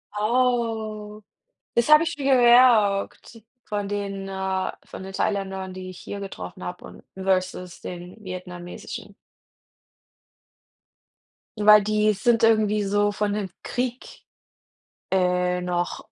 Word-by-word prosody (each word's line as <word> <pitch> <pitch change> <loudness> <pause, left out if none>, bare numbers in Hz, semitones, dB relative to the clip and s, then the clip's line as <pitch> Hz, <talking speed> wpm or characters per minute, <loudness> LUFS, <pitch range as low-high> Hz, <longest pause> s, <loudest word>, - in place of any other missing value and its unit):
Oh. 220 -2 -1 0.5
Das 235 +5 +2
habe 305 +2 +8
ich 335 -2 -3
mir 280 - -5
gemerkt 235 -3 +4 0.2
von 205 -1 -3
den 200 -1 -4
äh, 190 -1 -2
von - - -9
den 195 - -8
Thailändern, 190 -2 -2
die 185 0 -7
ich 185 - -12
hier 205 - -7
getroffen 95 - -8
habe, - - -7
und - - -13 0.2
versus 185 -2 -1
den 180 +4 -9
vietnamesischen. 180 -1 -8 2.4
Weil 210 0 +7
die 215 0 +2
sind 230 +3 +2
irgendwie 215 -2 +3
so 205 +1 +1
von 205 0 -1
dem 205 -2 -3
Krieg, 250 0 -4 0.9
äh, 180 -1 +1
noch 175 0 -2
205 Hz, 115 wpm, -24 LUFS, 185-220 Hz, 2.4 s, habe